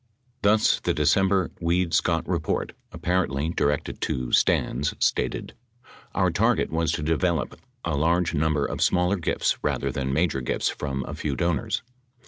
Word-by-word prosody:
2 100 - +4
Thus, 110 0 +3
the - - -1
December 95 +5 +2
Weed 85 0 0
Scott - - +1
report, - - -1 0.2
apparently 80 -5 -1
directed 75 -3 -1
to 65 -1 -2
Stans, 70 +4 +2
stated: - - -1 0.6
Our 95 -3 +2
target 110 +7 +1
was 80 0 +1
to 75 - -2
develop 80 +2 0 0.3
a 80 -3 0
large 85 +4 +1
number 80 -1 +1
of - - -4
smaller 90 +2 +2
gifts 85 - 0
rather - - 0
than 65 -1 -2
major 75 -2 +1
gifts 60 - 0
from 70 -2 -4
a - - -5
few 70 -3 -3
donors. 85 +1 -1
80 Hz, 150 wpm, -25 LUFS, 75-90 Hz, 0.6 s, 2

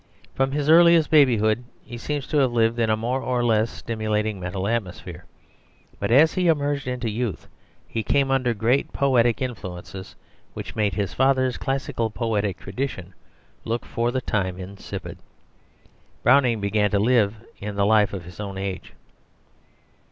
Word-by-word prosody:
From 135 0 0
his 145 0 -1
earliest 170 0 +6
babyhood 120 -6 +4 0.2
he 120 - -9
seems 145 +3 -3
to 150 - 0
have 135 -3 +3
lived 115 0 +1
in 115 -1 +2
a 110 - +2
more 125 +4 -2
or 125 -1 -1
less 110 -1 +2
stimulating 110 -3 -2
mental 95 +2 -3
atmosphere; 110 -6 -4 0.7
but 100 - -2
as 145 +7 +5
he 180 -1 +1
emerged 145 -4 +1
into 125 -2 -3
youth 110 -1 -3 0.4
he 115 - -3
came 135 +5 +1
under 130 -3 +1
great 115 +6 +1
poetic 125 -3 +2
influences, 95 -5 -7 0.4
which - - -7
made 105 -3 0
his 100 -2 -2
father's 130 -1 +2
classical 135 -4 -2
poetic 105 -4 -1
tradition 95 -3 -5 0.5
look 115 +1 -3
for 120 +1 -1
the 130 +1 -1
time 95 -6 -2
insipid. 95 +2 -8 1.0
Browning 125 -3 +4
began 105 +1 +1
to 100 - +1
live 110 -1 +3 0.2
in 105 0 -5
the 100 0 +2
life 105 -2 +4
of 95 -4 -6
his 90 +2 -12
own 100 -2 -5
age. 95 -1 -5
115 Hz, 155 wpm, -23 LUFS, 100-130 Hz, 1.0 s, earliest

